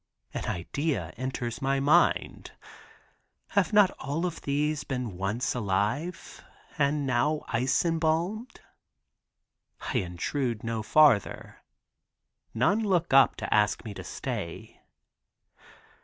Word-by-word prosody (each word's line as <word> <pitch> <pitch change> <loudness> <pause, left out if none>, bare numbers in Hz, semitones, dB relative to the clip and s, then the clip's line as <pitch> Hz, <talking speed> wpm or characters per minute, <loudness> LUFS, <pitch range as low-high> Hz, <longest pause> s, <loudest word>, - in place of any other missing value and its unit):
An - - -4
idea 95 - -2
enters 125 -2 -4
my 135 0 +1
mind. 150 +6 +2 1.0
Have - - +1
not 205 -3 +5
all 140 +4 -3
these 150 -1 -2
been 125 -7 -4
once 100 +6 -2
alive, 120 - -2 0.4
and 145 0 +1
now 135 +4 +1
ice 125 +8 +1
embalmed? 170 +8 -1 1.2
I - - -1
intrude 115 - -3
no 115 -1 -2
farther. 130 -2 +3 0.9
None 155 - +2
look 185 -8 0
up 135 0 +6
to - - -3
ask 105 +2 +2
me 105 - -6
to - - -8
stay. 85 0 -6
135 Hz, 105 wpm, -28 LUFS, 115-155 Hz, 1.2 s, up